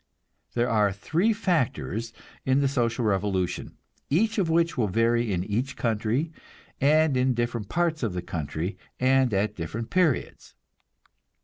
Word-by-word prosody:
There 120 0 +2
are 105 -4 +3
three 160 - +1
factors 155 - -1 0.3
in 130 +1 +2
the 140 - +3
social 120 -3 0
revolution, 95 -3 -1 0.3
each 215 +9 +2
of 180 -4 +1
which 165 +1 +2
will 120 -6 +1
vary 115 +3 +2
in 90 -2 0
each 120 +7 -2
country, 115 +7 0 0.5
and 155 +1 +4
in 130 0 +2
different 120 -3 -2
parts 170 -2 0
of 110 -7 -1
the 90 -1 -4
country, 80 +2 -4 0.2
and 130 -1 +3
at 105 +1 0
different 110 +7 -5
periods. 180 -7 0
120 Hz, 140 wpm, -26 LUFS, 105-150 Hz, 0.5 s, and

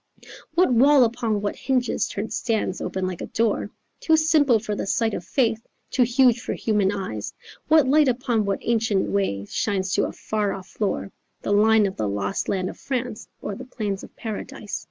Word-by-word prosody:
What 350 -6 +4
wall 270 +3 +6
upon 225 -3 0
what 205 - -1
hinges 255 -3 0
turned 210 +2 -4
stands 220 -5 -1
open 190 -1 -2
like 185 -2 -4
a - - -4
door? 220 -2 0 0.3
Too 320 -1 +3
simple 310 -6 +4
for 210 -1 -4
the 205 - -3
sight 225 +1 +1
of - - -4
faith, 230 -3 +1 0.3
too 255 - +1
huge 245 0 +4
for - - -3
human 210 -3 +1
eyes, 110 - -5 0.3
What 310 -3 +5
light 295 +2 +5
upon 240 -3 +1
what 195 -1 0
ancient 225 -4 +1
way 145 - 0
shines 190 - -1
to - - +2
a - - -6
far 210 -2 -2
off 190 -1 -8
floor, 200 -2 -3 0.3
The 205 - 0
line 215 +1 +5
of 190 - -3
the 105 -2 -1
lost 100 0 -2
land 185 -2 0
of - - -8
France 245 -4 -4 0.2
or 205 - -3
the 250 - -7
plains 210 -6 -4
of - - -13
Paradise? 215 -2 -5
220 Hz, 195 wpm, -24 LUFS, 195-250 Hz, 0.3 s, wall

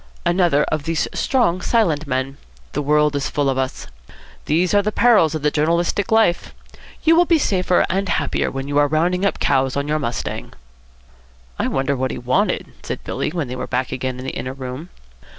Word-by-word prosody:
"Another 175 -4 +3
of 155 -1 -2
these 165 -1 0
strong 210 -10 +1
silent 165 -11 +1
men. 130 +1 -2 0.3
The - - -2
world 150 0 +2
is 140 +1 -1
full 145 -2 0
of 130 - -2
us. 130 0 -3 0.6
These 170 +5 +1
are 205 - +5
the 210 +1 -1
perils 210 -11 +4
of 155 - -4
the 150 - +2
journalistic 170 +6 0
life. 220 -6 +2 0.5
You 325 +1 +5
will 350 +1 +5
be 335 -1 +4
safer 185 - +2
and 195 0 -1
happier - - 0
when 135 0 -5
you 145 0 +1
are 145 - +4
rounding 175 +6 +1
up - - -2
cows 135 -1 +1
on 140 +1 -1
your 155 +1 0
mustang." 120 -5 -4 1.1
"I - - +1
wonder 135 +1 0
what 130 0 -1
he - - -4
wanted," 125 +1 0
said - - -6
Billy, - - -2
when 160 -3 -3
they 125 - -5
were - - -5
back 130 0 -2
again 130 0 -3
in 130 - -7
the - - -3
inner 130 - -5
room. 135 +5 -7
150 Hz, 200 wpm, -20 LUFS, 135-180 Hz, 1.1 s, are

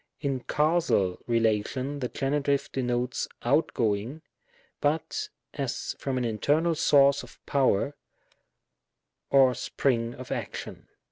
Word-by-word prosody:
In 140 -3 -1
Causal 140 - +1
relation, 115 +4 0
the 125 - -1
Genitive 140 +1 0
denotes 125 -1 -1 0.2
out 140 +7 +2
going, 115 +7 -1 0.6
but 150 +2 -1 0.2
as - - -3
from 135 -2 -2
an 125 - 0
internal 145 +10 +1
source 140 -2 +4
of - - -14
power, 140 0 +2 1.3
or 135 -2 +6
spring 120 -3 -1
of 130 0 -9
action. - - -5
135 Hz, 110 wpm, -27 LUFS, 120-145 Hz, 1.3 s, or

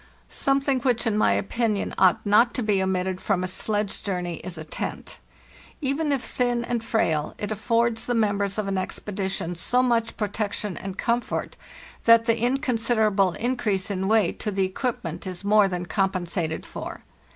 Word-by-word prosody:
Something 275 -1 +1
which, 245 -2 +1
in 225 -2 +1
my 215 - +3
opinion, 215 -1 -1
ought 190 +2 +3
not 220 +4 +4
to 250 - -1
be 205 -3 +2
omitted 190 0 -1
from 190 -3 0
a - - -1
sledge 205 +2 -1
journey 180 -4 -3
is 180 -2 -6
a 155 - -7
¢ez¢. - - -5 0.6
Even 290 +2 0
if 275 -3 0
thin 245 -1 0
and 235 -2 -2
frail, 165 -10 0
it 205 0 -4
affords 230 +1 +1
the 245 - +1
members 205 -2 +1
of 210 -2 -1
an 195 -1 0
expedition 190 -2 -3
so 245 +9 +2
much 230 -2 +1
protection 210 -1 -2
and 195 0 -6
comfort 235 +1 -1 0.5
that 230 0 +7
the 230 -1 +2
inconsiderable 230 - +2
increase 215 -5 -1
in 190 -1 -1
weight 215 -4 +2
to 215 - -2
the 195 -1 +1
equipment 185 - -3
is 185 0 -5
more 210 0 +5
than 180 -2 -3
compensated 175 -2 -1
for. - - -7
210 Hz, 165 wpm, -25 LUFS, 190-235 Hz, 0.6 s, that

